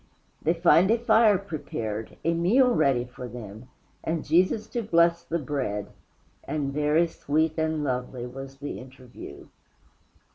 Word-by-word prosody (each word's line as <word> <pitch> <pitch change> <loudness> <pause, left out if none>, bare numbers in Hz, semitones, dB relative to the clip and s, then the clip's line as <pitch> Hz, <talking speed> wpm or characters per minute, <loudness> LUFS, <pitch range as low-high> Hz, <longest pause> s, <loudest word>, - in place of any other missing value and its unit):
They 165 +3 +1
find 170 +2 +5
a 230 - +4
fire 220 -3 +4
prepared, 115 - -5
a 165 - +3
meal 235 +10 +4
ready 135 - +2
for 125 0 -9
them, 115 -1 -9 0.4
and 160 -1 -2
Jesus 185 +7 +2
to 240 - -2
bless 170 -4 +3
the 170 0 -2
bread, 130 -9 -3 0.5
and 145 -3 -3
very 150 +3 +3
sweet 155 -1 -1
and 160 -1 -1
lovely 125 -2 -3
was 135 +2 -9
the 145 +1 -6
interview. 130 -1 -12
155 Hz, 140 wpm, -26 LUFS, 130-170 Hz, 0.5 s, find